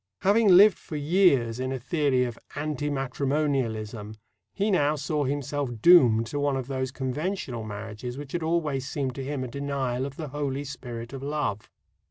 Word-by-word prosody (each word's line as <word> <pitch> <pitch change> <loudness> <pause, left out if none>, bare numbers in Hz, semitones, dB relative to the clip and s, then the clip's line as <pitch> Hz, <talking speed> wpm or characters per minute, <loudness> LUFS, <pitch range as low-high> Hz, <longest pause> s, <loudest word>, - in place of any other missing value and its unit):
Having 210 +3 +4
lived 205 -1 +7
for 155 - -8
years 145 -7 +3
in 130 0 -2
a 135 - -2
theory 135 0 +1
of 120 -2 -4 0.2
"anti 145 -1 -2
matrimonialism," 130 -6 -1 0.4
he 205 +2 0
now 150 -5 +3
saw 150 0 -1
himself 145 0 -2
doomed 120 -8 +6
to 145 +6 -4
one 145 -1 +1
of 130 - -3
those 130 0 -2
conventional 130 - -3
marriages 110 +4 -6
which 145 -1 -8
had 175 - -2
always 155 -5 -1
seemed 135 -3 -2
to 135 - -5
him 140 -1 -3
a - - -4
denial 135 -1 -2
of 135 - -10
the 155 -2 -6
holy 140 0 -3
spirit 120 -3 -7
of 135 - -6
love. 140 -8 -2
140 Hz, 175 wpm, -27 LUFS, 125-150 Hz, 0.4 s, lived